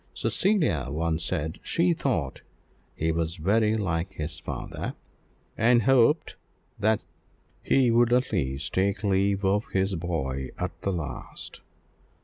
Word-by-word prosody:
Cecilia 160 - +1
once 80 +2 -1
said 80 -3 -2
she 170 +1 +2
thought 120 - -2 0.5
he 80 +1 0
was 80 0 -1
very 105 +5 +2
like 90 -2 -1
his 80 -1 -5
father, - - -5 0.6
and 120 0 +4
hoped 135 +5 +3 0.4
that 110 +1 +2 0.6
he 130 -3 +3
would 120 0 +4
at 125 +1 +2
least 70 -7 -2
take 100 +2 +1
leave 100 0 +2
of 100 +3 +1
his 95 +1 +1
boy 70 -7 -3
at - - -2
the 100 - 0
last. 85 -5 -6
95 Hz, 130 wpm, -27 LUFS, 80-115 Hz, 0.6 s, and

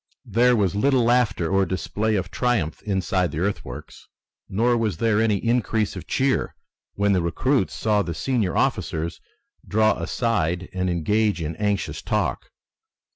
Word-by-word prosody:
There 120 +2 +3
was 100 -5 +1
little 125 +4 +2
laughter 115 -7 +2
or 95 +3 +2
display 105 +3 -1
of 90 -2 -2
triumph 115 -11 0
inside 95 -3 0
the 70 - -6
earthworks, 100 +4 -4 0.4
nor 120 +5 +2
was 110 -7 -1
there 110 0 +2
any 110 -2 +2
increase 115 -2 0
of 90 - -8
cheer 135 0 0 0.4
when 100 0 +2
the 90 - +2
recruits 110 - 0
saw 105 -2 +1
the 85 -4 -4
senior 110 - 0
officers 80 +1 -1 0.5
draw 110 +1 +2
aside 90 -7 -1
and 95 -1 -1
engage 105 +5 +1
in 80 0 -3
anxious 105 0 -1
talk. - - -2
105 Hz, 145 wpm, -23 LUFS, 90-115 Hz, 0.5 s, There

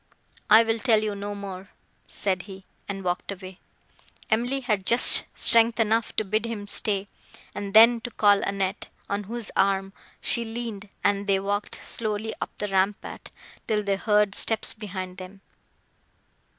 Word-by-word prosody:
"I 220 +2 +8
will 225 0 -1
tell 220 -3 +2
you 210 -1 -2
no 205 +1 -6
more," 195 -1 -8 0.4
said 190 -3 -2
he, 190 -1 -11 0.2
and 195 -1 -5
walked 180 +2 -3
away. 190 -1 -10 0.7
Emily 245 +5 0
had 215 -6 -1
just 235 +6 +6
strength 230 0 +3
enough 225 0 +1
to 215 - 0
bid 215 +3 -1
him 215 -3 -5
stay, 205 -1 +2 0.5
and 200 0 -6
then 230 +2 +7
to 245 - -6
call 205 -3 +3
Annette, 195 0 -3 0.2
on 200 0 -2
whose 230 +1 -6
arm 195 0 +1 0.3
she 235 - +2
leaned, 225 -3 -6
and 200 0 0
they 195 -1 +2
walked 205 +1 -3
slowly 215 -1 -3
up - - -3
the 210 - -3
rampart, 195 +2 -2 0.4
till 210 -1 0
they 200 -1 0
heard 210 0 +1
steps 225 +1 +2
behind 185 -3 -7
them. 190 +1 -11
205 Hz, 155 wpm, -25 LUFS, 195-225 Hz, 0.7 s, I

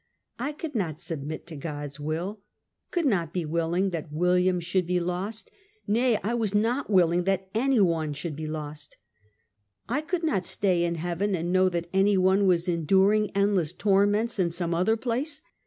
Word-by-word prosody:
I 270 +5 -2
could 305 0 -6
not 170 - -2
sub 160 -4 -3
mit 155 +3 -6
to 165 - -9
God's 145 -1 -6
will 165 +8 -3 0.3
— - - -46
could 345 -3 -1
not 175 - +1
be 180 -3 -1
willing 170 +4 0
that 160 -3 -5
William 180 +3 +2
should 175 +1 -1
be 180 0 +1
lost 185 +5 -4 0.2
— 425 0 -39
nay, 235 +2 +3
I 220 +4 -1
was 220 -4 -1
not 230 +6 +1
walling 175 -3 +3
that 190 -1 -1
any 255 +2 +2
one 165 -5 +2
should 145 +2 -5
be 155 +1 -5
lost. 150 -1 -7 0.9
I 260 +7 0
could 335 +2 -3
not 200 - 0
stay 180 -4 +1
in 170 0 -1
heaven, 175 +4 -1
and 175 +1 -2
know 185 0 +4
that 170 -1 -2
any 195 +1 +4
one 190 +2 +3
was 175 -1 +2
enduring 190 +5 +3
endless 200 -6 +2
torments 205 +2 +2
in 175 -2 +2
some 170 0 -2
other 185 +7 +2
place! 270 +7 -2
185 Hz, 190 wpm, -27 LUFS, 170-210 Hz, 0.9 s, know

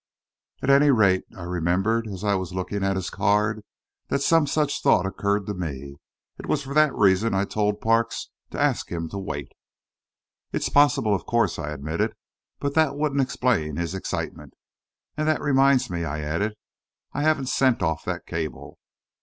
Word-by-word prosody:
"At 140 - +3
any 140 +1 +6
rate, 100 -8 +4
I 90 - -7
remember, 90 +6 0
as 95 0 -7
I 100 -1 +2
was 95 -1 -3
looking 95 +2 -3
at 95 0 +1
his 95 -1 -3
card, 105 +2 +1 0.5
that 140 - 0
some 165 0 +4
such 150 0 0
thought 90 - +4
occurred 100 +1 -1
to 105 - -3
me. 70 -6 -6 0.4
It - - -8
was 145 - 0
for 135 +1 -6
that 155 -1 +4
reason 100 +2 +3
I 95 +1 +1
told 105 0 -1
Parks 115 +1 +1 0.2
to - - -6
ask - - 0
him 85 -1 -3
to 100 - -5
wait." 70 -8 -5 1.0
"It's - - -1
possible, 145 -6 +4
of 95 - -2
course," 115 -9 +1
I 75 -2 -4
admitted. 75 +2 -2 0.4
"But 140 0 -2
that 155 -3 +2
wouldn't 145 -1 +1
explain 120 - 0
his 85 +1 -3
excitement. 95 - -5 0.6
And 155 0 0
that 155 - +2
reminds 135 -2 +3
me," 85 -2 -3
I 75 -1 -3
added, 85 +9 -2 0.6
"I 145 - -2
haven't 145 -4 +1
sent 130 -2 +2
off 80 -2 -1
that - - -4
cable." 80 -2 -5
105 Hz, 175 wpm, -24 LUFS, 90-135 Hz, 1.0 s, any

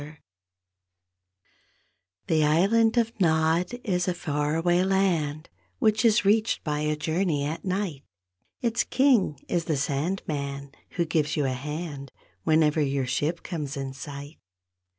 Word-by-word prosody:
C 150 +1 -12 2.1
he 155 -1 +3
island 210 +10 +3
of 230 -1 +2
Nod 165 +2 +2
is 180 -4 0
a 180 - 0
far 150 -2 -1
away 175 +2 +2
land 170 -6 0 0.3
Which 215 -1 +2
is 220 -3 +4
reached 215 +2 +2
by 150 -1 -1
a 150 0 0
journey 155 -1 0
at 160 +3 -4
night; 185 -6 -2 0.6
Its 235 -1 +1
King 245 - +2
is 170 -2 -1
the 155 -3 0
Sandman 140 -2 -3 0.3
who 170 - +2
gives 155 -2 0
you 145 - +1
a - - +1
hand 145 +1 -5 0.3
Whenever 155 -1 +3
your 140 -2 0
ship 150 +6 -1
comes 150 -5 -4
in 135 -1 -4
sight. 140 +3 -9
160 Hz, 135 wpm, -26 LUFS, 145-185 Hz, 2.1 s, is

